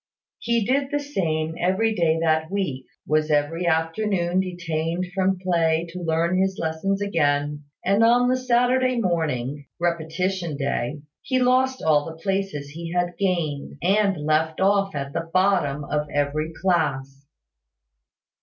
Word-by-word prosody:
He 235 -2 0
did 270 +3 +1
the 290 0 0
same 160 - -2
every 195 +5 +1
day 165 -5 +2
that 160 -1 +1
week; 180 -10 -3 0.2
was 155 0 +1
every 155 +4 +1
afternoon 175 +2 +1
detained 170 -1 -2
from 190 0 +1
play 170 -3 +1
to 180 +1 -7
learn 170 +2 +1
his 190 0 0
lessons 180 +5 -1
again; 145 -5 0 0.2
and 200 +4 +3
on 240 +2 +5
the 255 - +3
Saturday 255 0 +2
morning 150 - -1
(repetition 170 0 -1
day) 140 +1 -2 0.2
he 260 - -1
lost 255 +1 +2
all 150 -2 +3
the 160 -1 -8
places 190 -5 -2
he 165 +2 -7
had 175 0 0
gained, 170 -8 -1
and 195 +1 +2
left 155 +1 0
off 195 -1 +2
at 140 0 -4
the 165 - -3
bottom 185 -6 +2
of 150 +1 -2
every 145 +2 -1
class. 140 -7 -1
170 Hz, 140 wpm, -24 LUFS, 155-195 Hz, 0.2 s, on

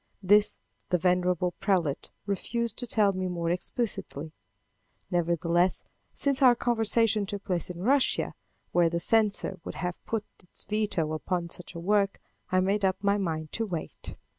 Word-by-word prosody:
This 205 +2 +4 0.3
the 180 - +3
venerable 180 0 +2
prelate 175 -8 0 0.2
refused 225 +3 -2
to 245 - -4
tell 210 -3 +3
me 185 0 -2
more 170 -2 -1
explicitly. 175 - -3 0.8
Nevertheless, 175 +1 +1 0.3
since 280 -1 0
our 250 -2 +7
conversation 225 -3 +2
took 200 0 -5
place 180 -3 -2
in 180 0 -6
Russia, 270 +4 +2 0.4
where 175 -1 +4
the 170 0 -1
censor 210 -1 +1
would - - -6
have 180 -1 -4
put 220 -2 -2 0.2
his 180 - -10
veto 205 -7 0
upon 170 +2 -2
such 180 0 -9
a - - -4
work, 200 +2 +1 0.3
I 185 0 +4
made 200 +2 +1
up 190 -1 +2
my 200 +1 +3
mind 155 -5 -3
to 225 - -1
wait. 170 -5 -6
185 Hz, 155 wpm, -28 LUFS, 175-210 Hz, 0.8 s, our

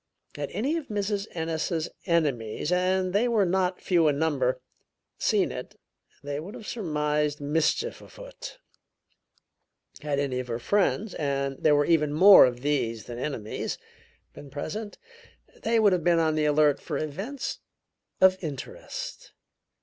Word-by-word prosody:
Had - - -4
any 280 +9 -1
of 315 - -6
Mrs. 205 0 -2
Ennis's 160 0 -2 0.2
enemies, 145 -5 0
and 185 0 +1
they 215 +5 +3
were 220 -4 +3
not 180 0 0
few 170 -4 +3
in 145 -2 +2
number, 140 -5 +1 0.6
seen - - +2
it, - - -7 0.5
they 145 0 -3
would 190 +9 -8
have 225 -4 -10
surmised 150 -7 -1
mischief 160 - 0
afoot; - - -10 1.4
had 145 -2 -1
any 135 -3 -1
of 125 - -5
her 115 -1 -2
friends, 200 - 0
and 140 -2 -2
there 150 -2 +5
were 145 0 +3
even 150 -3 +2
more 190 0 +9
of 120 -1 -5
these 115 -6 -1
than 120 +2 -8
enemies, 120 -6 -4 0.6
been 145 - -11
present, 180 +10 -5 0.6
they 230 0 +2
would 205 -3 +5
have 175 -3 0
been 175 0 +4
on 160 -1 +2
the 155 0 +1
alert 150 -1 +3
for 150 - -4
events 230 - -4 0.6
of 185 0 +4
interest. - - -7
160 Hz, 145 wpm, -27 LUFS, 145-200 Hz, 1.4 s, more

